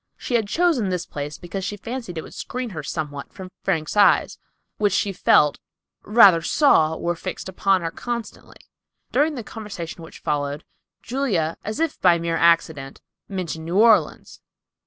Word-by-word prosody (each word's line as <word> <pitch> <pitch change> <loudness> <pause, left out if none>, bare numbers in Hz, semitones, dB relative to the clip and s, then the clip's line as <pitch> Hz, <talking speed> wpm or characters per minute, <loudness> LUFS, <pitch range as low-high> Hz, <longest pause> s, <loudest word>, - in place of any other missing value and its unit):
She - - -6
had 225 -3 +2
chosen 310 - +1
this 180 -2 -2
place, 145 +1 -6
because 190 +2 -6
she 205 +2 -4
fancied 230 -4 -6
it 160 - -4
would - - -12
screen 250 -2 -5
her 160 -4 -5
somewhat 145 -2 -5
from 185 -1 -10
Frank's 165 -4 -1
eyes, 205 - +4 0.4
which 205 -3 +1
she 200 0 0
felt, 150 -4 +3 0.4
rather 205 -6 +6
than - - -12
saw, 160 - +3
were 175 - -1
fixed 185 +3 -6
upon 190 0 +1
her 165 - -2
constantly. 235 0 -7 0.5
During 295 +4 +2
the 240 - -5
conversation 200 -7 -8
which 165 - -11
followed, 145 0 -2 0.4
Julia, 220 - -1
as 215 +6 -4
if 325 -2 -1
by 175 -2 +5
mere 170 0 -2
accident, 160 -5 +1 0.3
mentioned 170 -5 -4
New 170 +3 -2
Orleans. 220 0 +3
185 Hz, 165 wpm, -22 LUFS, 165-220 Hz, 0.5 s, rather